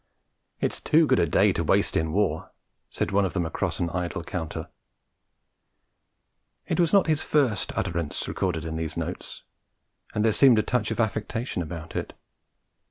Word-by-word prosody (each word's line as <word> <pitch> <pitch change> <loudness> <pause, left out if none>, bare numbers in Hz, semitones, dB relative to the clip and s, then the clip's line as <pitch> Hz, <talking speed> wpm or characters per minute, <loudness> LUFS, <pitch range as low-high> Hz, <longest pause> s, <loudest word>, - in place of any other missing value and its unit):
'It's - - -1
too 160 +1 +4
good 130 -3 +3
a 85 - +3
day - - +4
to - - -1
waste - - +2
in 80 0 +1
war,' 90 -4 0 0.4
said - - -2
one 100 +1 +3
of 95 - -1
them 90 -3 0
across 80 - -2
an 85 -1 -1
idle 85 -1 -3
counter. 85 -2 -5 2.0
It - - -1
was 170 -2 +3
not 200 - +5
his 155 -2 +1
first 135 -8 +1
utterance 85 -5 -2
recorded 85 -4 -2
in 80 0 -4
these 80 -1 -4
notes; - - -5 0.7
and 105 +1 +2
there 110 - +4
seemed 130 -2 +6
a 110 - +3
touch 120 -4 0
of - - -3
affectation 110 -1 -1
about 85 0 -7
it. - - -3
95 Hz, 165 wpm, -26 LUFS, 85-120 Hz, 2.0 s, seemed